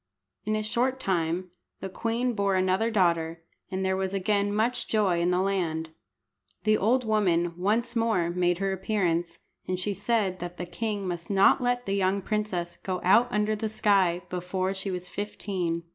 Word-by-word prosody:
In 215 +1 0
a 215 - -1
short 250 +5 0
time 180 -3 -1 0.3
the - - -4
queen 235 +5 -1
bore 200 -2 +1
another 185 +4 +2
daughter, 170 -5 +1 0.3
and 190 0 -2
there 190 0 +1
was 190 0 -2
again 200 +1 +1
much 230 +4 0
joy 195 -6 +2
in 175 - +2
the 180 +1 +2
land. 165 -5 -1 0.7
The 215 0 +4
old 240 +6 +2
woman 175 -6 +2
once 225 +7 0
more 220 -7 +1
made 175 0 +1
her 195 +1 -1
appearance, 175 -4 -1 0.3
and 185 0 -1
she 205 +2 -1
said 200 -2 0
that 175 0 -6
the 175 - -4
king 205 +1 -3
must 175 -1 -5
not 195 +3 +5
let 245 0 0
the 195 - -1
young 195 0 +1
princess 185 -5 -2
go 185 +1 -3
out 220 +7 +5
under 210 0 +1
the 215 +1 -3
sky 190 -5 +2
before 185 +1 -2
she 195 +1 -4
was 180 -1 -4
fifteen. 185 -5 -3
190 Hz, 175 wpm, -27 LUFS, 180-215 Hz, 0.7 s, not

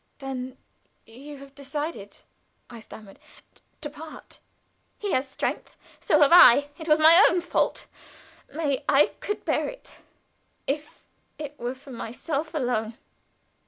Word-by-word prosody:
"Then 260 -1 -6 0.5
you 275 +6 -11
have 275 0 -14
decided?" 280 -6 -6 0.5
I 235 - -9
stammered. 215 -2 -13 0.6
"To 295 - -5
part. 310 +1 -11 0.6
He 410 -2 -4
has 260 +2 0
strength. - - -4 0.2
So 305 - +2
have 290 - +6
I. 285 -5 +8
It 320 0 -6
was 305 - +6
my 325 +5 +7
own 355 - +1
fault. 345 - -1 0.7
May 290 -2 -2
I 285 +1 +4
could 415 - -4
bear - - 0
it - - -12 0.7
if 295 +2 -5 0.3
it 295 -1 -8
were 245 +2 -4
for 270 +1 -14
myself 280 +7 -5
alone. 235 -5 -2
285 Hz, 130 wpm, -25 LUFS, 255-310 Hz, 0.7 s, I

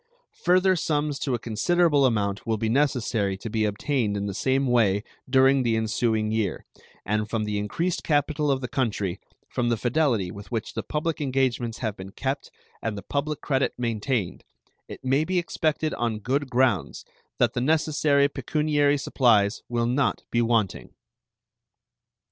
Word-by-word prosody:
Further 185 +1 +4
sums 150 -3 -1
to 130 -4 -1
a 115 - -7
considerable 145 +5 +3
amount 105 -3 -1
will 110 -1 +1
be 110 +1 -1
necessary 115 -7 +1
to 110 +2 -7
be 110 -1 +1
obtained 105 0 -1
in 100 - -2
the 100 - -3
same 135 +6 +1
way 110 -5 +2 0.3
during 135 +1 +5
the 115 -3 +1
ensuing 110 -1 0
year, 110 -3 -1 0.4
and 105 +1 -1
from 110 -1 -1
the 105 -1 -2
increased 165 - -2
capital 150 0 +1
of 135 -1 +1
the 125 - -3
country, 105 -8 -1 0.3
from 120 -1 -1
the 115 - +1
fidelity 120 - +1
with 100 +4 -11
which 115 -2 -3
the - - -2
public 155 0 -2
engagements 130 -4 0
have 110 -4 -3
been 95 -1 -9
kept 135 +3 -3 0.3
and 110 -2 -3
the 100 - -7
public 145 +5 -2
credit 135 -2 0
maintained, 115 -4 -2 0.4
it - - -10
may 135 +4 +3
be 185 +3 -1
expected 155 -2 0
on 115 -2 -1
good 130 +6 -1
grounds 120 - +1 0.3
that - - +2
the 120 - -1
necessary 150 -1 +3
pecuniary 145 0 +1
supplies 115 -6 +2
will 120 -1 0
not 130 +3 0
be 120 - +2
wanting. 115 -4 0
125 Hz, 160 wpm, -25 LUFS, 110-145 Hz, 0.4 s, during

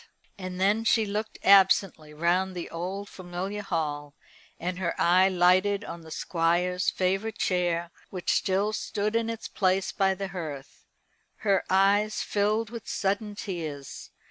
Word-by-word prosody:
And 185 -1 -6
then 205 +4 +2
she 225 -1 +3
looked 210 +2 -4
absently 190 -5 +4
round 175 +4 0
the 175 - -6
old 185 +4 -4
familiar 185 +3 -5
hall, 150 -6 -3 0.4
and 180 +2 -3
her 170 -3 -2
eye 185 +2 +5
lighted 185 +3 +3
on 170 - -7
the 160 - -13
Squire's 175 +3 0
favourite 195 +4 -1
chair, 175 -2 0 0.2
which 185 -2 -2
still 200 +2 +1
stood 210 0 -2
in 230 0 +1
its 230 -1 -5
place 190 0 +1
by 190 -1 +1
the 195 0 -4
hearth. 155 -7 -7 0.6
Her 195 -2 +3
eyes 200 +3 +3
filled 210 +2 0
with 230 -3 -8
sudden 205 +1 -1
tears. 160 - -6
190 Hz, 145 wpm, -27 LUFS, 175-205 Hz, 0.6 s, eye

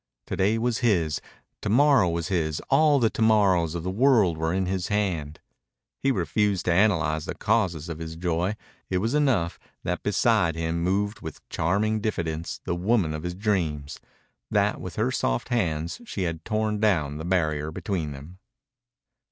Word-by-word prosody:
To - - -4
day 105 +4 +2
was 115 0 0
his. 90 - +1 0.4
To 105 - -2
morrow 130 -4 +5
was 85 +1 -2
his. 80 -5 0
All 150 +1 +5
the 115 -4 +2
to - - -5
morrows 95 -7 +3
of 85 - -4
the 90 - -2
world 110 -5 +4
were 80 +1 -1
in 95 +1 0
his 95 -1 -2
hand. 90 -8 -1 0.6
He 135 - +2
refused 100 - 0
to 85 - +2
analyze 85 -6 +2
the - - -5
causes 95 -8 0
of 80 -1 -6
his 80 0 -6
joy. 90 +3 -1 0.3
It 95 - +1
was 110 +7 0
enough 130 - +1 0.2
that - - -2
beside 85 -2 +2
him 80 +1 -2
moved 100 +4 0
with 80 - -9
charming 105 +6 0
diffidence 85 -6 -3
the - - -2
woman 90 -2 +1
of 75 - -4
his 90 +1 -4
dreams, 80 -8 -1 0.5
that - - +1
with - - -7
her - - 0
soft - - -1
hands 85 - -1
she 105 - -4
had 85 -2 -3
torn 110 -1 -1
down 80 -9 +1
the - - -5
barrier 80 -4 0
between 85 -1 -3
them. 75 +7 -11
90 Hz, 175 wpm, -26 LUFS, 80-105 Hz, 0.6 s, morrow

